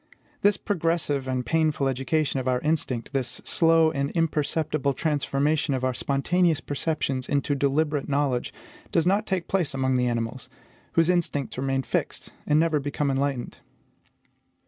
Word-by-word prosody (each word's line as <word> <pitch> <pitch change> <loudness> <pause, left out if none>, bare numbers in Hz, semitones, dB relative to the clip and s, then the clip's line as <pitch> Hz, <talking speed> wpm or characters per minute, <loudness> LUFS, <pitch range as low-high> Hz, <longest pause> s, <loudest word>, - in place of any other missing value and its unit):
This 205 0 +4
progressive 165 -7 -1
and 130 -1 -1
painful 155 -4 +1
education 135 +2 0
of 130 - -4
our 125 -1 +2
instinct, 145 -6 -1
this 130 -3 -2
slow 165 -1 +4
and 140 -1 -1
imperceptible 155 -3 0
transformation 145 -1 0
of 130 - -3
our 130 0 +1
spontaneous 160 +6 +1
perceptions 140 -4 -2
into 145 0 +1
deliberate 145 +1 0
knowledge, 140 -3 0 0.4
does 165 - +2
not 200 +4 +2
take 185 -3 -1
place 175 -8 0
among 130 -1 +1
the 125 0 +1
animals, 120 +1 -3 0.4
whose 165 -1 +3
instincts 160 -8 0
remain 135 0 0
fixed, - - -3
and 150 +1 +4
never 160 -2 +2
become 145 0 -1
enlightened. 135 -2 -2
145 Hz, 145 wpm, -26 LUFS, 135-160 Hz, 0.4 s, This